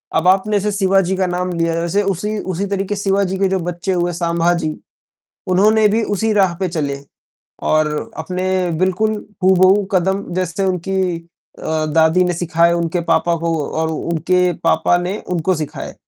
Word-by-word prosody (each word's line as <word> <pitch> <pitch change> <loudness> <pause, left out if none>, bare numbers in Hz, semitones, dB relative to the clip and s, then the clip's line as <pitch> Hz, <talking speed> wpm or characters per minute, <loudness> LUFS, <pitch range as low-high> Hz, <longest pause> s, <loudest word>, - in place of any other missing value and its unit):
अब 170 +3 +2
आपने 200 +2 +3
जैसे 210 +1 -1
शिवाजी 190 -1 +2
का 185 -1 +1
नाम 180 +1 -2
लिया 165 0 +1
वैसे 170 +5 0
उसी 200 +3 -2 0.2
उसी 195 +4 -2
तरीके 200 +1 -2
शिवाजी 195 -1 0
के 195 0 +2
जो 190 -1 0
बच्चे 175 +2 -3
हुए, 175 0 0
संभाजी 170 -1 0 0.7
उन्होंने 210 +4 +4
भी 220 +2 +1
उसी 215 +2 -1
राह 190 -4 +3
पे 190 - 0
चले, 140 -4 -3 0.6
और 155 -1 0
अपने 180 +3 -3 0.3
बिल्कुल 190 +4 +1 0.3
हूबहू 190 +2 +5
कदम 190 +2 +1
जैसे 185 +1 -1
उनकी 185 -1 -1 0.4
अ, 155 -1 -2
दादी 160 +3 +3
ने 175 - 0
सिखाया 170 0 +2
उनके 170 +1 -1
पापा 170 -1 +2
को 165 0 -1
और 160 0 -1
उनके 175 +3 0
पापा 160 +2 +3
ने 185 +4 -3
उनको 180 +1 0
सिखाए। 155 -3 -6
180 Hz, 160 wpm, -18 LUFS, 170-195 Hz, 0.7 s, हूबहू